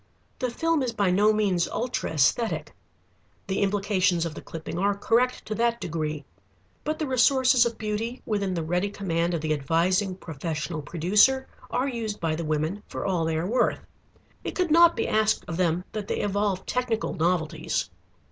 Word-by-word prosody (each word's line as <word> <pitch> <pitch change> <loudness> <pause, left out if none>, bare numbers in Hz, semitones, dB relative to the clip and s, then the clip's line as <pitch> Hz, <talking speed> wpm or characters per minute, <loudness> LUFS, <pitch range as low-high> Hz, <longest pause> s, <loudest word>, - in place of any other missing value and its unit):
The 255 - 0
film 325 +5 0
is 250 -3 -1
by 200 -3 +1
no 205 +4 +4
means 200 -5 +1
ultra 245 -8 -2
æsthetic. 160 - +1 0.8
The 190 -1 -2
implications 195 -3 +1
of 165 - -4
the - - -8
clipping 165 +1 -6
are 200 +1 +1
correct 240 +4 +1
to 215 - -3
that 235 +1 +1
degree. 155 -3 -3 0.6
But 310 +1 -2
the 310 - -2
resources 255 -1 +4
of 235 - -6
beauty 220 +3 -3
within 200 -4 -1
the 165 - -2
ready 180 +5 0
command 175 -4 -1
of 165 - -2
the 155 0 0
advising 175 +7 +1
professional 160 -1 -4
producer 200 - +3 0.2
are 255 +2 0
used 225 -5 -3
by 160 -2 0
the 165 - -4
women 155 +6 -1
for - - -5
all 180 -4 0
they 160 0 0
are 160 - -1
worth. 240 +7 +1 0.6
It - - -4
could 360 -4 0
not 340 +1 +7
be - - -1
asked 220 0 +2
of 165 - -4
them 175 -1 +1
that 210 -2 -5
they - - -1
evolve 200 -2 -1
technical 240 -2 -1
novelties. 170 -2 -1
200 Hz, 175 wpm, -26 LUFS, 165-235 Hz, 0.8 s, not